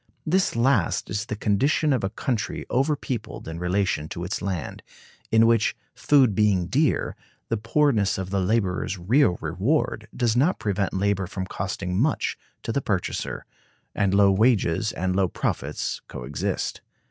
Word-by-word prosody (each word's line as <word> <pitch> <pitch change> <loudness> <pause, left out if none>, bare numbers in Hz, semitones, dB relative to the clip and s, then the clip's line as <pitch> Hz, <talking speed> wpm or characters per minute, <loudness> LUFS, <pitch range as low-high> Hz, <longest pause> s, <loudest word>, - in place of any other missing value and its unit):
This 185 0 +1
last 130 -3 +1
is 105 +3 -2
the 105 - -3
condition 135 +9 +2
of 125 - 0
a 95 - 0
country 115 +1 -3
over 140 +4 +2
peopled 125 - -5
in 80 +1 -5
relation 90 -4 0
to 85 - -5
its 90 - -3
land; 90 -5 -4 0.5
in 110 0 +6
which, 115 -2 +3 0.2
food 135 -7 +4
being 100 -4 +2
dear, 140 - +1 0.3
the 115 - +1
poorness 110 -1 +2
of 95 0 -4
the 100 - +1
laborer's 95 -1 0
real 100 +3 +3
reward 105 - 0
does 120 -3 +1
not 150 +9 +3
prevent 100 -3 -1
labor 100 -1 0
from 95 +1 -4
costing 90 0 -4
much 150 +3 +1 0.3
to - - -2
the 140 - 0
purchaser, 95 -7 -2 0.5
and 100 -2 +1
low 100 -1 +6
wages 110 -2 +2
and 95 +1 -2
low 95 -1 +3
profits - - -3
coexist. - - -3
105 Hz, 155 wpm, -25 LUFS, 95-120 Hz, 0.5 s, in